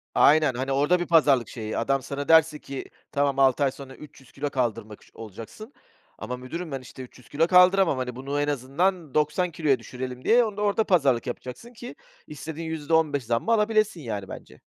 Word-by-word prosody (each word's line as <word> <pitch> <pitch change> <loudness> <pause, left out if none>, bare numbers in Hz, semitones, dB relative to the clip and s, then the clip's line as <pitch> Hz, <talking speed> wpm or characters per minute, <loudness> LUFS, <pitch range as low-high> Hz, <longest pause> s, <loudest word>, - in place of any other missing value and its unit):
Aynen. 150 -2 +5
Hani, 130 +2 -3
orada 145 +6 +2
bir 175 - -2
pazarlık 145 -8 +3
şeyi, 110 -3 -5
adam 135 +3 0
sana 140 +1 -5
derse 160 -2 +4
ki, 135 -2 -7 0.3
"Tamam, 140 -1 0
6 135 +1 +3
ay 135 - +2
sonra 135 -1 -11
300 140 -4 -15
kilo 145 +1 -4
kaldırmak 115 -5 -3
ş - - -22
olacaksın." 115 - -11 0.4
Ama 125 +3 -6
müdürüm 160 +7 -7
ben, 135 -1 -4
işte, 130 +1 -11
"300 125 -1 -16
kilo 160 +3 +1
kaldıramam. 180 -3 +5
Hani, 125 -1 -4
bunu 140 +3 -3
en 145 - -1
azından 150 +4 -1
90 155 +4 0
kiloya 150 -5 +1
düşürelim." 125 +2 -7
diye 240 +2 +5
onu 210 -2 -6
da - - -3
orada 210 +1 +1
pazarlık 140 - +2
yapacaksın 130 - -7
ki 240 +1 -10 0.3
istediğin 160 +2 -7
%15 155 -2 0
zammı 115 - -1
alabilesin, 215 -4 +1
yani, 105 -6 -5
bence. - - -11
145 Hz, 185 wpm, -25 LUFS, 130-165 Hz, 0.4 s, Aynen